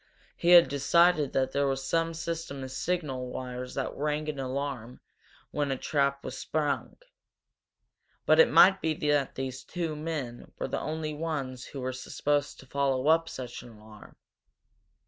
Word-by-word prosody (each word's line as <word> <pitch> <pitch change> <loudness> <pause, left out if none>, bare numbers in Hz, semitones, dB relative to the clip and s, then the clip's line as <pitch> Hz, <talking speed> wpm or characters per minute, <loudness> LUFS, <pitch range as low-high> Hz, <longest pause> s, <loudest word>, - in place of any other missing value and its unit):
He 170 - 0
had 170 -5 +9
decided 145 +2 +3
that 130 0 +1
there 140 0 +1
was 135 0 -2
some 165 0 0
system 165 -4 -4
of 130 - -7
signal 135 -4 -2
wires 125 0 -6
that 135 - -3
rang 150 +1 -1
an 145 -2 -4
alarm 130 -2 -4 0.5
when 145 -1 -1
a 135 - -1
trap 140 -1 0
was - - -5
sprung. 145 -5 -2 1.3
But - - +5
it 485 - +8
might 190 +1 +7
be 160 -1 0
that 145 -2 0
these 130 0 -5
two 165 -1 -3
men 150 -6 -5
were - - -3
the - - -3
only 155 0 -3
ones 145 -5 -4
who 135 - -7
were 130 0 -2
supposed 145 +2 -1
to - - -15
follow 135 +1 0
up 165 +1 +4
such 125 -2 -7
an - - -12
alarm. 105 0 -15
140 Hz, 165 wpm, -29 LUFS, 130-155 Hz, 1.3 s, had